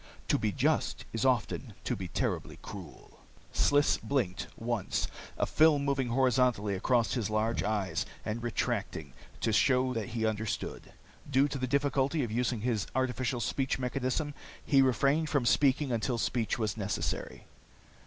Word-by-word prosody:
To -, -, +3 dB
be -, -, 0 dB
just -, -, 0 dB
is -, -, 0 dB
often -, -, 0 dB
to -, -, -1 dB
be 95 Hz, -2 st, -5 dB
terribly -, -, -2 dB
cruel." -, -, -10 dB, 0.3 s
Sliss 145 Hz, 0 st, +3 dB
blinked, 120 Hz, -10 st, -1 dB
once, 115 Hz, -4 st, -1 dB, 0.3 s
a -, -, +2 dB
film 150 Hz, -2 st, +4 dB
moving 135 Hz, -2 st, +1 dB
horizontally 125 Hz, -4 st, +2 dB
across 115 Hz, +3 st, +1 dB
his 115 Hz, -5 st, -1 dB
large 110 Hz, +2 st, 0 dB
eyes 100 Hz, -2 st, -1 dB, 0.2 s
and 110 Hz, +2 st, -2 dB
retracting, 120 Hz, -2 st, -2 dB, 0.3 s
to 110 Hz, -, +1 dB
show 130 Hz, +3 st, +3 dB
that 115 Hz, 0 st, -3 dB
he 115 Hz, -1 st, -1 dB
understood. 110 Hz, -1 st, -3 dB, 0.4 s
Due 135 Hz, +1 st, +4 dB
to 140 Hz, -, -4 dB
the 130 Hz, -, -1 dB
difficulty 140 Hz, +2 st, +1 dB
of 115 Hz, -, -3 dB
using 120 Hz, -1 st, 0 dB
his 110 Hz, -4 st, 0 dB
artificial 130 Hz, -1 st, 0 dB
speech 135 Hz, +3 st, 0 dB
mechanism, 130 Hz, +3 st, -1 dB, 0.3 s
he 135 Hz, -2 st, +5 dB
refrained 140 Hz, +5 st, +2 dB
from 140 Hz, -5 st, +1 dB
speaking 140 Hz, +2 st, +3 dB
until 120 Hz, +1 st, 0 dB
speech 115 Hz, -1 st, 0 dB
was 110 Hz, -3 st, -1 dB
necessary. 100 Hz, -2 st, -3 dB
125 Hz, 150 wpm, -31 LUFS, 110-135 Hz, 0.4 s, he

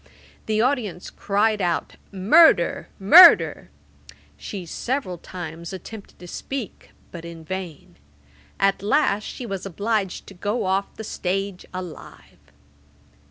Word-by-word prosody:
The 215 Hz, 0 st, +1 dB
audience 225 Hz, -, -2 dB
cried 210 Hz, +1 st, 0 dB
out 175 Hz, -2 st, -2 dB, 0.2 s
"Murder! 220 Hz, -, +4 dB
Murder!" 335 Hz, -, +7 dB, 0.7 s
She 195 Hz, -4 st, -7 dB
several 210 Hz, -, -4 dB
times 170 Hz, -1 st, -8 dB
attempted 205 Hz, +2 st, -10 dB
to 180 Hz, -, -12 dB
speak; 255 Hz, +4 st, -7 dB, 0.2 s
but 170 Hz, -2 st, -9 dB
in 165 Hz, -1 st, -10 dB
vain. 180 Hz, -, -7 dB, 0.6 s
At 195 Hz, -1 st, +2 dB
last 210 Hz, -2 st, +1 dB
she 250 Hz, -, -7 dB
was 195 Hz, -4 st, -5 dB
obliged 200 Hz, 0 st, -2 dB
to -, -, -12 dB
go 205 Hz, +5 st, -3 dB
off 195 Hz, +1 st, -1 dB
the 220 Hz, -, -8 dB
stage 195 Hz, -1 st, -4 dB
alive.' 180 Hz, -3 st, -10 dB
195 Hz, 115 wpm, -23 LUFS, 180-220 Hz, 0.7 s, Murder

